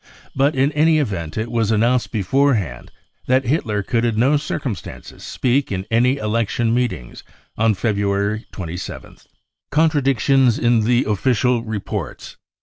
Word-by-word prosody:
But 140 +2 +2
in 135 +2 +2
any 155 +2 +3
event 95 - -3
it 110 +1 -3
was 115 -3 0
announced 120 +3 +1
beforehand 110 - 0 0.4
that 130 +1 +2
Hitler 115 -7 0
could 115 +3 0
in 115 -2 0
no 130 +6 +3
cir 150 +1 -2
cumstances 110 - -7
speak 130 +1 -1
in 95 -1 -3
any 125 +4 +3
election 115 0 0
meetings 120 - -3 0.3
on 110 -1 +2
February 100 +1 -1
27 90 -1 -7
th. - - -26 0.4
Contradictions 135 -5 +2
in 120 -2 +2
the 120 +2 +2
Official 120 +2 +1
Reports. 110 -4 -5
115 Hz, 140 wpm, -20 LUFS, 105-130 Hz, 0.4 s, any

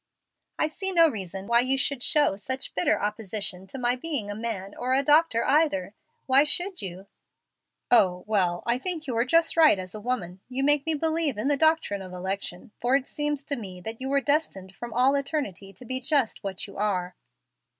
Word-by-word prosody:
"I - - +2
see 385 +5 -3
no 335 -2 +6
reason 195 - -5
why 235 +2 +4
you 260 +2 +1
should 275 -1 +1
show 290 -6 +3
such 260 +7 -3
bitter 180 - +1
opposition 205 -3 -3
to 270 - -8
my 245 -1 +1
being 255 -7 -3
a - - -5
man 205 -3 -5
or 255 +1 -1
a 275 - +2
doctor 295 -5 +3
either. 270 - +2 0.3
Why 270 +2 +5
should 355 +5 +1
you?" 185 0 -7 0.9
"O 185 -6 +4
well 185 -5 0
I 235 +1 +1
think 330 +1 -3
you 255 -4 -3
are 230 +1 +2
just 330 +5 +2
right 315 -9 +6
as 185 0 -5
a 215 - -7
woman. 195 -7 -3
You 260 +1 -2
make 290 +1 +2
me 320 - +1
believe 315 -4 0
in 225 +7 -1
the 290 - +3
doctrine 315 -10 +1
of 185 -1 -9
election, 190 +1 -5
for 245 +3 +2
it 275 -1 +1
seems 295 -1 -3
to 285 0 -2
me 190 -7 -8
that 220 +5 -6
you 265 - -3
were 280 0 +2
destined 245 -10 -1
from 240 +3 -8
all 255 +4 +3
eternity 275 - -3
to 205 +7 -14
be 255 +2 -2
just 270 -3 0
what 195 -2 -4
you 200 - -12
are." 185 -3 -1
245 Hz, 205 wpm, -26 LUFS, 195-290 Hz, 0.9 s, no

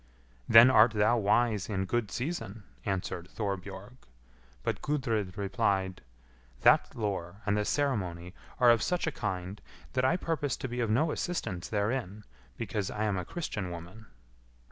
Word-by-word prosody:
"Then 115 +3 +9
art 115 -1 +6
thou 105 +3 +3
wise 110 0 +2
in 95 -2 -1
good 115 +1 -1
season," 120 - -4 0.2
answered 90 -2 -3
Thorbjorg; 100 +2 -5 0.7
but - - -2
Gudrid 115 -9 -1
replied, 95 -1 0 0.6
"That - - +4
lore 100 -2 -4
and 100 -1 +2
the 105 0 0
ceremony 95 -12 -1 0.3
are 120 -1 +7
of 115 -2 +3
such 180 +6 0
a 160 - 0
kind, 95 -4 -4 0.3
that 130 - +1
I 160 +7 +3
purpose 150 -7 -2
to - - -4
be 125 0 -5
of 115 -2 0
no 150 +9 +2
assistance 95 - -3
therein, 105 -1 -2 0.3
because 105 -3 -2
I 105 - -3
am 105 -2 +1
a - - -3
Christian 105 - -4
woman." 90 +6 -9
105 Hz, 150 wpm, -30 LUFS, 95-120 Hz, 0.7 s, Then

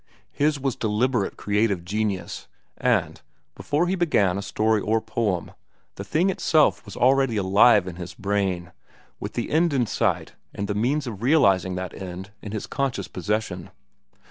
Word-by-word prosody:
His 145 0 +1
was 135 -2 -1
deliberate 110 0 0
creative 105 -4 0
genius, 100 -1 -3 0.3
and, - - 0 0.3
before 150 +4 0
he 180 - 0
began 145 - +2
a 100 - -2
story 110 +2 +1
or 110 +2 +1
poem, 110 -5 -2 0.4
the 100 - -7
thing 165 - +1
itself 160 -4 +2
was - - -10
already 130 -2 +3
alive 100 +1 +5
in 90 -2 -7
his 90 -2 -7
brain, 95 -3 -1 0.5
with - - -6
the 120 - -3
end 165 0 +3
in 130 -3 +2
sight 100 - -1 0.2
and 100 - -3
the 105 - -1
means 130 +8 0
of 110 -5 -6
realizing 100 - +3
that 90 -2 -5
end 95 +1 -8
in 105 - -7
his 105 -1 -4
conscious 135 -9 -2
possession. 95 -2 -3
105 Hz, 160 wpm, -24 LUFS, 95-130 Hz, 0.5 s, alive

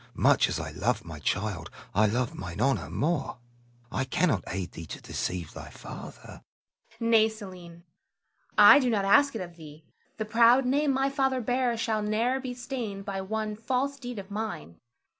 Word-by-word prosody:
much - - +4
as - - -2
I 80 -1 -5
love 105 +6 -1
my 80 -3 -8
child, 95 +2 -2 0.2
I 105 +2 +4
love 120 +3 -1
mine 90 +1 -7
honor 135 +4 +1
more. 155 -3 -1 0.5
I 135 - 0
cannot 135 - +1
aid 90 -2 -4
thee 80 0 -9
to - - -7
deceive 90 -3 -4
thy - - -9
father. - - -10
Zara. - - -12 0.6
Nay, 225 -2 +4
Selim, 180 -6 -11 0.7
I - - +10
do 255 -3 +1
not 205 -4 +1
ask 280 +6 +5
it 225 - -3
of 175 -1 -8
thee. 155 -1 -12 0.3
The 215 - -2
proud 235 +4 +5
name 280 +3 +2
my 270 +1 +1
father 265 -2 +1
bears 245 0 0
shall 220 -2 0
ne'er 225 +5 +1
be 255 -2 -5
stained 235 -6 -5
by 195 -1 -3
one 215 +2 -3
false 260 +5 -1
deed 245 -2 -6
of 200 0 -8
mine. 85 - -5
210 Hz, 180 wpm, -28 LUFS, -, 0.7 s, I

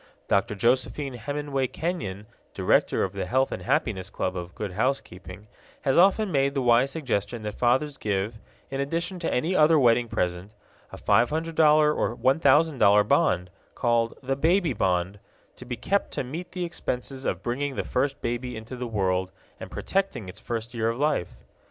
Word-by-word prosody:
Dr. 105 +3 +1
Josephine 130 +5 0
Hemenway 140 +2 -2
Kenyon, 120 - -4 0.3
director - - +2
of - - -2
the - - -4
Health 130 +2 +1
and - - -4
Happiness 115 - -1
Club 90 - -3
of 90 -1 -6
Good 105 -3 -4
Housekeeping, 105 -4 -3 0.4
has 135 - +2
often 195 +3 +4
made 140 -1 +1
the 135 - +1
wise 120 +2 +4
suggestion 120 -7 -2
that 105 0 -4
fathers 135 +4 +1
give, 105 +2 -2 0.3
in 135 0 -2
addition 170 +6 -2
to 170 - -2
any 165 +9 0
other 155 0 +5
wedding 120 -3 +4
present, 90 0 -2 0.4
a - - -8
$500 150 +6 +3
or 120 - -1
$1000 130 -5 +4
bond, 90 - +2 0.2
called 115 -1 +1
"The 135 +1 0
Baby 165 +2 +2
Bond," 95 -1 0 0.4
to - - -11
be 120 -1 -5
kept 195 - 0
to - - -2
meet 160 +8 -7
the 180 -1 -2
expenses 135 -5 -4
of - - -2
bringing 135 +3 -2
the - - -2
first 135 +2 -1
baby 120 +1 -3
into 110 +3 -8
the 125 0 -4
world 95 -4 0 0.3
and - - -8
protecting 195 - -2
its 90 - -10
first 115 0 -5
year 115 -1 0
of 115 - -3
life. 145 - -1
125 Hz, 170 wpm, -26 LUFS, 105-150 Hz, 0.4 s, other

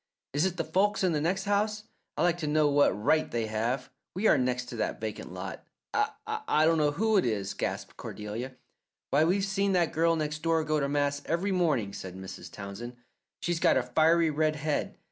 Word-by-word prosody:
"Is 145 +5 +2
it 180 -1 -5
the 165 - 0
folks 190 +6 +1
in 185 - +3
the 150 -2 0
next 185 +5 0
house? 210 +1 0 0.3
I'd - - +2
like 175 0 +2
to 155 - -2
know 150 0 +3
what 145 0 +4
right 110 +11 +1
they 115 -2 -1
have! 115 +5 -2 0.2
We 195 +4 -2
are - - +6
next 125 -2 0
to - - -6
that 110 - -2
vacant 110 -1 -5
lot." - - -6 0.3
"I 155 - 0
dunno 155 -3 +3
who 220 +5 +2
it 190 - +4
is," 100 -4 -1
gasped - - -4
Cordelia. 110 +5 -6 0.6
"Why, 150 +3 +4
we've 190 +3 +2
seen 195 0 +1
that 175 -4 +2
girl 165 +1 +3
next 150 -1 -2
door 165 0 +2
go 155 0 +1
to 140 -1 0
mass 145 0 0
every 175 +5 0
morning," 150 - +1
said 95 -2 -7
Mrs. 95 0 -9
Townsend. 105 +5 -7 0.5
"She's 175 -1 -1
got - - +4
a - - +2
fiery 165 0 +3
red 155 +1 +1
head. 150 0 -2
155 Hz, 200 wpm, -29 LUFS, 125-175 Hz, 0.6 s, are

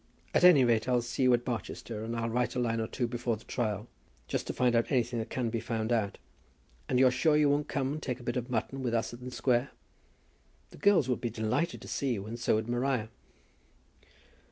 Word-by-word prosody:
At - - +3
any 175 -7 +8
rate 115 0 +2
I'll 125 -1 +2
see 120 - -4
you 130 -1 +5
at 120 - -5
Barchester, 115 -2 -4
and 115 +1 -4
I'll 115 0 -1
write 125 +2 0
a - - 0
line 115 -2 0
or 110 - -1
two 120 - -2
before 120 -1 -2
the 110 - -16
trial, 110 -3 -2 0.4
just - - -2
to - - -2
find 125 -1 +2
out 115 - +1
anything 120 -2 +1
that 110 0 -4
can 120 -3 -2
be 115 - -1
found 110 0 -2
out. 110 -4 0 0.7
And 125 - +2
you're 130 0 +6
sure 150 +5 +3
you 150 -1 +4
won't 145 +1 0
come 135 0 -1
and 155 - -5
take 125 -3 -3
a - - -11
bit 120 0 -2
of 125 0 -3
mutton 125 +3 -2
with 120 -2 -1
us 115 +1 -1
in 120 +1 -10
the 125 - -5
Square? 125 0 +1 1.0
The - - -13
girls 200 -10 +4
would 125 - -1
be 120 - -1
delighted 110 +10 -1
to - - -10
see 135 -3 -1
you, 100 -3 -4
and 115 +2 -6
so 120 - +2
would 110 +1 -1
Maria." 120 -2 0
120 Hz, 235 wpm, -30 LUFS, 115-130 Hz, 1.0 s, any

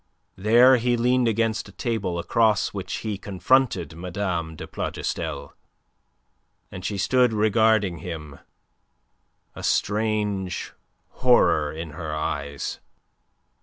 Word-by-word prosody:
There 120 +6 +6
he 120 +1 +1
leaned 125 +1 +2
against 115 0 0
a - - -12
table, 110 -7 -2
across 105 +4 +2
which 95 -2 -6
he 105 -3 -3
confronted 100 -3 +1
Mme. 85 -2 -3
de - - -7
Plougastel. - - -4 1.2
And 90 - -8
she 100 - -3
stood 125 +4 +3
regarding 110 -4 +2
him, 75 -6 -7 1.1
a - - -9
strange 105 -3 -1 0.4
horror 75 -1 +3
in 80 0 -7
her 80 0 -5
eyes. 70 -2 -3
100 Hz, 105 wpm, -24 LUFS, 85-115 Hz, 1.2 s, There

